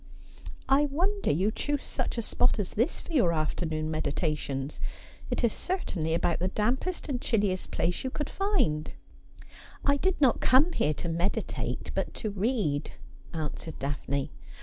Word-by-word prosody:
' - - -20 0.3
I 275 +2 +5
wonder 365 +8 0
you 190 +8 +2
choose 290 +4 -1
such 255 -2 -2
a 230 - 0
spot 245 +3 +2
as 205 -4 -2
this 235 +10 +1
for 340 - -9
your 215 - +4
afternoon 155 0 -1
N 155 - -2
194 155 +1 0
Asphodel, 150 -2 -2
meditations. 135 +2 -5 0.5
It - - -1
is 235 - +3
certainly 175 - -1
about 170 0 +1
the 180 - +1
dampest 250 - 0
and 255 -4 -2
chilliest 200 -5 +1
place 175 +1 0
you 260 - -1
could 295 +3 -3
find.' 365 - +1 0.5
' - - -18
I 280 0 +4
did 375 +5 +1
not 265 -5 +4
come 275 +7 +5
here 150 0 +1
to 170 - -4
meditate, 170 +4 -1
but - - -2
to 215 - -3
read,' 200 - 0 0.4
answered 160 -1 -4
Daphne. 140 0 -2
205 Hz, 170 wpm, -29 LUFS, -, 0.5 s, I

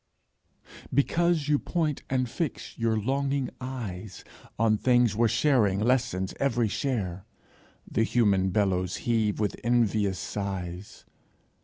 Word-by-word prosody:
Because 165 +2 +2
you 150 -1 +3
point 155 -5 -1
and 130 -1 +1
fix 150 +5 -4
your 115 -1 0
longing 135 +3 -1
eyes 110 -7 -6 0.3
On 110 -1 +3
things 120 -1 +3
where 115 +1 +3
sharing 115 -6 +2
lessens 105 -5 0
every 120 -5 +1
share, 100 -9 -2 0.6
The - - -1
human 105 -5 +2
bellows 95 -2 0
heave 110 -3 +1
with 105 -2 0
envious 110 -5 +2
sighs. 95 -2 -5
115 Hz, 115 wpm, -27 LUFS, 100-130 Hz, 0.6 s, you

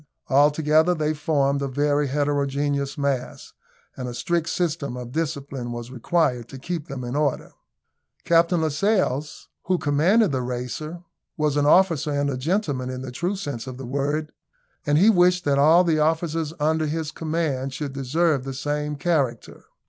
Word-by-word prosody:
Altogether 150 +4 +4
they 155 -1 0
formed 140 -2 0
a 140 - -1
very 145 +2 +1
heterogeneous 140 0 -1
mass, 140 -3 -3 0.4
and 125 -1 -5
a 120 - -6
strict 170 +4 -1
system 155 -7 -2
of 125 -1 -7
discipline 140 -5 -3
was 120 +1 -6
required 130 -2 0
to 135 - -9
keep 165 +3 -5
them 135 -2 -6
in 120 +2 -4
order. 145 -2 -1 0.7
Captain 170 0 +3
Lascelles, 155 -3 0 0.2
who 185 0 +1
commanded 170 +8 +3
the 130 -2 -1
Racer, 125 +7 -5 0.3
was 150 -2 +1
an 145 0 +2
officer 165 -3 +4
and 145 0 0
a - - -2
gentleman 145 -4 -1
in 130 0 -5
the 130 - -6
true 175 +10 -2
sense 140 -10 -5
of 130 -1 -7
the 135 - -7
word, 145 +4 -2 0.6
and 145 0 +3
he 190 +7 +5
wished 180 -2 +3
that 140 -1 +2
all 160 +5 +6
the 165 -3 +1
officers 160 0 0
under 155 +1 +1
his 155 0 -3
command 155 -5 -2
should 140 0 -5
deserve 140 +2 +1
the 135 0 -6
same 150 +2 -2
character. 140 -6 -1
145 Hz, 165 wpm, -24 LUFS, 135-160 Hz, 0.7 s, all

